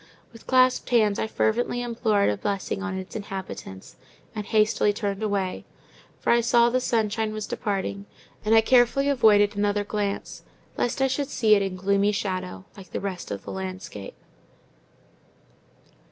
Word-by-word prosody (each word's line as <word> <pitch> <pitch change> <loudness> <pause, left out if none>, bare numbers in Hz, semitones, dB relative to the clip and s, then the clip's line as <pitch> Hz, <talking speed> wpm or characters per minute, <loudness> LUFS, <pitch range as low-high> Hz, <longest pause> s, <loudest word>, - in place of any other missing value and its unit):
With 230 - -15
clasped 255 -1 +3
hands 215 -5 +3
I - - -1
fervently 240 +2 0
implored 225 - +1
a - - -1
blessing 195 - -3
on 200 -2 -3
its 190 0 -8
inhabitants, 190 - -7 0.4
and 210 -2 -5
hastily 215 -1 +3
turned 200 -1 -3
away; 200 -3 -2 0.6
for - - +1
I 235 0 +4
saw 235 0 +4
the 255 - +2
sunshine 220 -2 0
was 215 -1 -4
departing; 200 -2 -3 0.4
and 220 +1 +3
I 225 - +7
carefully 255 +4 +3
avoided 210 -6 +4
another 205 0 +1
glance, 205 -1 -3 0.3
lest 255 +3 0
I - - +4
should 280 +1 -2
see 220 -6 +3
it 205 - +4
in 195 -1 -2
gloomy 200 +2 +2
shadow, 185 -2 -4
like 190 -4 -13
the - - -1
rest 190 -3 -5
of 100 -1 -5
the - - -7
landscape. 185 - -7
210 Hz, 155 wpm, -25 LUFS, 195-230 Hz, 0.6 s, I